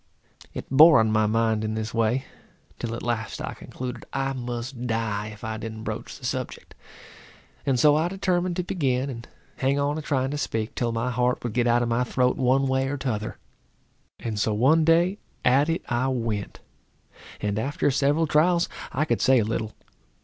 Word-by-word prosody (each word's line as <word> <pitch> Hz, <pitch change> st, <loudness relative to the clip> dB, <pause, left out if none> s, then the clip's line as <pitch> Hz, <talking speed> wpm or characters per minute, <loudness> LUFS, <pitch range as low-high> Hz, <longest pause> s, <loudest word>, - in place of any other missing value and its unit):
It -, -, -5 dB
bore 150 Hz, 0 st, +8 dB
on 110 Hz, -1 st, +2 dB
my 110 Hz, 0 st, +3 dB
mind 110 Hz, 0 st, +1 dB
in 110 Hz, 0 st, -2 dB
this 110 Hz, 0 st, -3 dB
way, 115 Hz, +3 st, +1 dB, 0.5 s
till 115 Hz, -1 st, -3 dB
at -, -, -7 dB
last 115 Hz, -3 st, -2 dB
I -, -, -4 dB
concluded 125 Hz, -1 st, -7 dB
I 135 Hz, 0 st, -1 dB
must 120 Hz, 0 st, -5 dB
die 110 Hz, -2 st, -1 dB
if 110 Hz, +1 st, -11 dB
I 110 Hz, -1 st, -3 dB
didn't 110 Hz, 0 st, -6 dB
broach -, -, -5 dB
the -, -, -10 dB
subject; -, -, -4 dB, 0.9 s
and 130 Hz, -3 st, +2 dB
so 150 Hz, +3 st, +6 dB
I 160 Hz, +2 st, +2 dB
determined 180 Hz, -1 st, 0 dB
to 180 Hz, -, -1 dB
begin 135 Hz, -6 st, -1 dB
and 115 Hz, -2 st, -8 dB, 0.3 s
hang 135 Hz, +1 st, +1 dB
on 145 Hz, +2 st, 0 dB
a -, -, -4 dB
trying 135 Hz, -3 st, 0 dB
to 145 Hz, -, -3 dB
speak, 110 Hz, -1 st, -2 dB
till 120 Hz, -3 st, -1 dB
my 115 Hz, +2 st, -1 dB
heart 125 Hz, 0 st, 0 dB
would 120 Hz, -3 st, -3 dB
get 120 Hz, 0 st, +2 dB
out 120 Hz, 0 st, +3 dB
of -, -, -1 dB
my 120 Hz, +2 st, +2 dB
throat 125 Hz, +1 st, +1 dB
one 135 Hz, +1 st, +2 dB
way 130 Hz, 0 st, +1 dB
or 145 Hz, +1 st, -2 dB
t'other. 110 Hz, -5 st, -3 dB, 0.8 s
And 110 Hz, -3 st, -3 dB
so 105 Hz, 0 st, +1 dB
one 145 Hz, +9 st, +4 dB
day 170 Hz, +5 st, +3 dB, 0.3 s
at 135 Hz, +5 st, +4 dB
it 165 Hz, -, -1 dB
I 120 Hz, +2 st, 0 dB
went, 115 Hz, -6 st, -3 dB, 0.8 s
and 105 Hz, 0 st, -1 dB
after 140 Hz, +4 st, 0 dB
several 145 Hz, +4 st, +2 dB
trials 170 Hz, +3 st, +3 dB, 0.2 s
I 150 Hz, +4 st, 0 dB
could -, -, 0 dB
say 130 Hz, 0 st, +5 dB
a 110 Hz, -, +2 dB
little. 110 Hz, 0 st, -2 dB
125 Hz, 195 wpm, -25 LUFS, 115-145 Hz, 0.9 s, bore